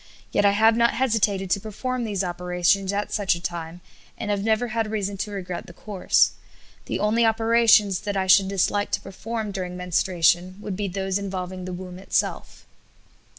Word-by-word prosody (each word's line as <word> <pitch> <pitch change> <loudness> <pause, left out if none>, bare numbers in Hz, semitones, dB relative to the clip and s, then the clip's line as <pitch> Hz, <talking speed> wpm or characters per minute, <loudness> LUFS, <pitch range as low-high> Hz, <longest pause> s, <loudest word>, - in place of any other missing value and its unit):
yet 205 - +2
I 200 - +5
have 220 +2 +4
not 235 0 +3
hesitated 210 -6 +1
to 200 - +3
perform 240 +4 -4
these 200 -3 -1
operations 180 +2 0
at 205 +1 -2
such 200 -4 +1
a - - -7
time, 170 0 -5 0.4
and 210 - -3
have 200 -1 -1
never 225 +2 +1
had 225 -1 -1
reason 205 -2 -2
to 210 - -3
regret 185 -3 -6
the 175 - -11
course. 205 -4 +2 0.5
The - - -2
only 215 +3 +2
operations 225 -3 +4
that 205 -1 -3
I 190 - +1
should 190 +1 +6
dislike 200 +1 0
to 200 - +1
perform 215 +2 -5
during 180 -2 -5
menstruation 180 0 +1
would 205 -2 -5
be 200 +1 -2
those 190 +1 -2
involving 185 -2 -5
the 185 - -5
womb 180 0 -8
itself." 195 - -2
195 Hz, 180 wpm, -24 LUFS, 185-215 Hz, 0.5 s, should